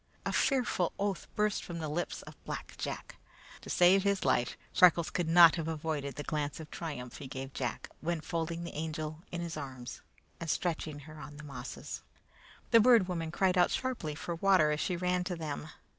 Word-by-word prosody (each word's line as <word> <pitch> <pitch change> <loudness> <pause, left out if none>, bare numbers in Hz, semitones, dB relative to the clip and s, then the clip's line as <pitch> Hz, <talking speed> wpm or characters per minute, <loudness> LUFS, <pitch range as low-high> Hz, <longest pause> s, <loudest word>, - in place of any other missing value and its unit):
A - - -1
fearful 245 - +2
oath 200 -2 -1
burst 210 -1 +1
from 175 - -6
the 160 -2 -3
lips 160 +4 -3
of - - -10
Black - - -6
Jack. - - -5 0.4
To - - -12
have - - -2
saved 185 +2 +6
his 200 -1 +1
life, 120 - +2 0.2
Freckles 175 -2 +6
could 175 -2 -1
not 170 0 +8
have 165 -1 -2
avoided 155 -3 -2
the 145 - -4
glance 150 -1 -2
of 155 -1 -9
triumph 135 -7 -5
he 140 - -7
gave 130 +1 -6
Jack, 125 -2 -3
when 170 +1 -1
folding 165 +1 -3
the 170 - -6
Angel 155 0 -4
in 175 - -3
his 170 -1 -4
arms 130 -4 -7 0.4
and 165 - -5
stretching 155 -2 -1
her 155 +1 -11
on 145 0 -9
the 150 - -9
mosses. 135 -3 -7 0.7
The 230 - +8
Bird 225 -4 +6
Woman 165 -3 -2
cried 185 +2 +2
out 175 - +5
sharply 235 - -2
for 170 +3 -4
water 170 -3 +4
as 150 - 0
she 180 - 0
ran 180 +1 +1
to 180 -1 -2
them. 155 -2 -5
165 Hz, 200 wpm, -32 LUFS, 150-180 Hz, 0.7 s, not